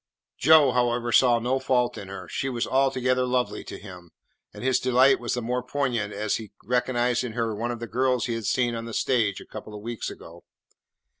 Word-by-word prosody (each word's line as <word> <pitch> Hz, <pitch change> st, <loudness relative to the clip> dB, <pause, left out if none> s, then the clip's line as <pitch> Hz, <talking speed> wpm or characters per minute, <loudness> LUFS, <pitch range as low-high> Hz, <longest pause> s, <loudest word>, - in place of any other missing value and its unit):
Joe, 155 Hz, -4 st, +6 dB
however, 120 Hz, -1 st, 0 dB
saw 120 Hz, 0 st, +5 dB
no 125 Hz, +3 st, 0 dB
fault 125 Hz, -2 st, +1 dB
in 100 Hz, -, -8 dB
her. 95 Hz, -2 st, -8 dB
She 135 Hz, -, -3 dB
was 120 Hz, -2 st, -2 dB
altogether 130 Hz, -1 st, +1 dB
lovely 125 Hz, -4 st, -1 dB
to -, -, -7 dB
him, 90 Hz, -3 st, -12 dB, 0.4 s
and -, -, -10 dB
his 130 Hz, 0 st, +2 dB
delight 130 Hz, +2 st, +4 dB
was 120 Hz, 0 st, -2 dB
the 125 Hz, -, -3 dB
more 125 Hz, +2 st, -1 dB
poignant 125 Hz, -5 st, -2 dB
as 105 Hz, 0 st, -1 dB
he 110 Hz, -2 st, -10 dB
recognised 125 Hz, +1 st, +1 dB
in 120 Hz, -3 st, -5 dB
her 115 Hz, -1 st, -1 dB
one 115 Hz, +3 st, -3 dB
of 120 Hz, -1 st, -4 dB
the 115 Hz, -, -5 dB
girls 125 Hz, 0 st, 0 dB
he 120 Hz, -, -2 dB
had 115 Hz, -2 st, -4 dB
seen 120 Hz, +3 st, +1 dB
on 115 Hz, 0 st, -4 dB
the 115 Hz, -, -6 dB
stage 110 Hz, -7 st, +1 dB
a -, -, -12 dB
couple 105 Hz, -, -9 dB
of 105 Hz, -, -8 dB
weeks 115 Hz, 0 st, -4 dB
ago. -, -, -12 dB
120 Hz, 215 wpm, -25 LUFS, 115-125 Hz, 0.4 s, Joe